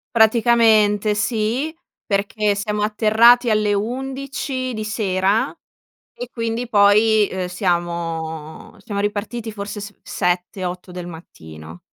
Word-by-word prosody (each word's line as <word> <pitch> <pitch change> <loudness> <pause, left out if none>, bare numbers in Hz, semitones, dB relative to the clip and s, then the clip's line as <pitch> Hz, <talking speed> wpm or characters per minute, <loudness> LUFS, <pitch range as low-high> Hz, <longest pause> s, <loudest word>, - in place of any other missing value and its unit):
Praticamente 220 -2 +4
sì, 230 +8 -1 0.3
perché 205 +1 0
siamo 210 +1 -3
atterrati 230 +3 +4
alle 210 -1 +2
11 260 +3 -3
di 215 0 -4
sera 215 - 0 0.6
e - - -7
quindi 230 +1 -3
poi, 210 0 +4
uhm, 185 -1 -3
siamo 170 -4 -3
siamo 205 -4 -5
ripartiti 215 +2 -3
forse 205 0 -6
s 205 0 -8
7-8 180 0 -3
del 180 -1 -7
mattino. 80 - -11
210 Hz, 105 wpm, -20 LUFS, 185-230 Hz, 0.6 s, Praticamente